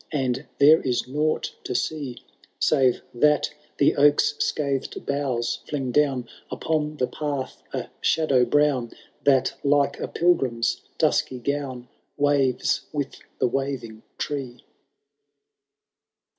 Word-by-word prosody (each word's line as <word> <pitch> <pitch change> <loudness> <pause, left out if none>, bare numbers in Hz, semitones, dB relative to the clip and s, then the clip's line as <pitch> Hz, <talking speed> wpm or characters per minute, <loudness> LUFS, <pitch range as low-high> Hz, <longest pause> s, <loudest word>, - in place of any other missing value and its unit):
And 130 -2 -1
there 155 +3 +7
is 125 -2 -1
nought 150 +4 -1
to - - -4
see, 140 -6 -2 0.4
Save 130 -5 +2
that 150 +4 +3 0.2
the - - +4
oak's 145 +1 +4
scathed 140 -2 -1
boughs 130 -4 -1
fiing 135 -4 -2
down 135 -4 +2 0.2
Upon 155 -1 -2
the 125 - +2
path 140 +1 -4
a - - -3 0.2
shadow 140 -6 +3
brown. 130 -2 +2 0.3
That, 135 -2 +4
like 140 -1 +2
a - - -3
pilgrim's 130 -9 +1 0.2
dusky 130 - +1
gown. 130 -1 -3 0.3
Waves 140 -3 +1
with 145 -2 -3 0.2
the - - +2
waving 125 -4 -3 0.2
tree.' 135 -4 -4
140 Hz, 115 wpm, -24 LUFS, 125-145 Hz, 0.4 s, there